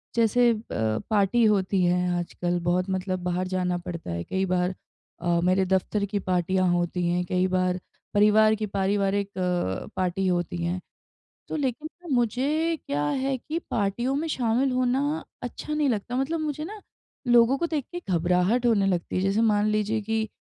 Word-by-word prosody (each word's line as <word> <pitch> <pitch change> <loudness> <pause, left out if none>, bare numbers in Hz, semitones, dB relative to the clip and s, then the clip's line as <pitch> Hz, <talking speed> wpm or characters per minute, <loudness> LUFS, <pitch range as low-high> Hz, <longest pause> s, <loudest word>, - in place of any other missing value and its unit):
जैसे 235 +1 +4
ब 110 - -2
पार्टी 215 +2 +3
होती 195 -3 +2
है 180 0 +1
आजकल 175 0 -2
बहुत 180 +2 +1
मतलब 185 0 -1
बाहर 180 +1 -1
जाना 180 -1 -1
पड़ता 175 - -6
है 85 0 -3
कई 190 - -1
बार 180 0 0 0.5
अ, 175 -1 +2
मेरे 185 +1 +3
दफ्तर 190 +2 0
की 205 0 -2
पार्टियाँ 185 0 +1
होती 175 0 0
है 175 +1 +1
कई 185 0 +2
बार 185 0 0 0.3
परिवार 215 +1 +5
की 215 0 -3
पारिवारिक 200 0 0
अ, 180 - -1
पार्टी 185 +1 0
होती 175 -1 -1
हैं। 175 +2 -1 0.7
तो - - -3
लेकिन 290 +1 -2 0.2
न 310 - -3
मुझे 280 +8 +1
क्या 145 +1 -1
है 265 - 0
कि 310 +6 -4
पार्टियों 235 +5 0
में 315 +3 -1
शामिल 250 -1 +1
होना 255 +1 +1 0.4
अच्छा 245 +5 -5
नहीं 300 -2 +1
लगता। 235 +1 -2
मतलब 295 +5 -1
मुझे 305 -1 -3
न 420 +6 -7 0.5
लोगों 240 +2 +6
को 340 - 0
देख 310 -5 -2
के 350 - -3
घबराहट 180 +8 +2
होने 205 -4 +3
लगती 180 -3 -1
है। - - +2
जैसे 195 +3 +1
मान 210 -2 +3
लीजिए 215 +1 0
कि 220 +1 -1
195 Hz, 175 wpm, -26 LUFS, 180-240 Hz, 0.7 s, लोगों